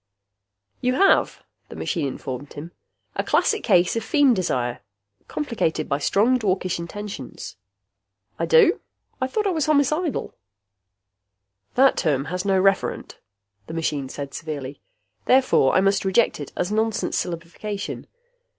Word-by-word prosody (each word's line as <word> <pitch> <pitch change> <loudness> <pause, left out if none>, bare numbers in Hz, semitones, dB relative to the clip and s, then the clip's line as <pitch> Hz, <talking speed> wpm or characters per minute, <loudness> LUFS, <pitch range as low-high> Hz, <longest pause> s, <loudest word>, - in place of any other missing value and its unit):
"You 250 +1 +1
have," 390 - +3 0.3
the - - -9
machine 160 -6 -2
informed 135 +1 -6
him, 155 +4 -8 0.4
"a - - -1
classic 435 - +1
case 180 -3 +3
of 230 - 0
feem 275 +2 +4
desire, 125 - -1 0.5
complicated 215 - -2
by 140 0 0
strong 230 - +2
dwarkish 185 -5 -1
intentions." 190 -4 -7 0.8
"I 165 - 0
do? 165 - +5 0.4
I 260 - +1
thought 420 +11 -1
I 395 - +2
was 315 -5 0
homicidal." 305 +2 +1 1.4
"That 265 +1 +5
term 145 -5 +1
has 180 0 -2
no 195 -2 +2
referent," 195 +1 0 0.5
the 160 - -6
machine 145 -5 -2
said 140 0 -7
severely. 145 -3 -6 0.4
"Therefore 255 - +4
I 190 - +5
must 195 0 +2
reject 190 +1 +2
it 145 - -7
as 180 +3 -1
nonsense 220 0 0
syllabification. 180 +4 -6
190 Hz, 130 wpm, -23 LUFS, 155-250 Hz, 1.4 s, do